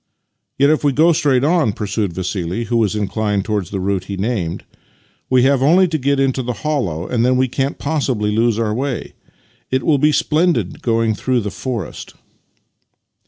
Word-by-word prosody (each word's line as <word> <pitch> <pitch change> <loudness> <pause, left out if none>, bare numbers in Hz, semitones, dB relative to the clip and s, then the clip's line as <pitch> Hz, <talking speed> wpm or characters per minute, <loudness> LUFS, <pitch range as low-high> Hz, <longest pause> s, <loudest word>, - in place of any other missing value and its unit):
" - - -56
Yet, 140 +2 +4
if 155 - +1
we 145 -2 +2
go 165 +5 +4
straight 145 -6 +2
on," 155 - +2
pursued 100 -2 -2
Vassili, 95 +3 -3
who 120 +1 -1
was 110 -3 +1
inclined 105 -1 -1
towards 105 -5 -2
the 100 - -3
route 95 -1 -1
he 100 0 -5
named, 95 -5 -2 0.3
" - - -38
we 130 -1 +4
have 135 0 +3
only 175 +7 +5
to 160 - 0
get 140 +1 +1
into 135 -1 +1
the 125 0 -3
hollow, 95 - -1
and 120 -2 0
then 125 +1 +3
we 130 0 +2
can't 135 +3 -2
possibly 130 -9 -1
lose 115 -1 +2
our 110 -2 0
way. 130 +2 -3 0.6
It 130 0 0
will 150 -4 +2
be 150 +2 +4
splendid 150 - 0
going 115 -1 +1
through 125 +3 0
the 105 -1 -4
forest." 120 -6 -6
120 Hz, 190 wpm, -18 LUFS, 105-140 Hz, 0.6 s, only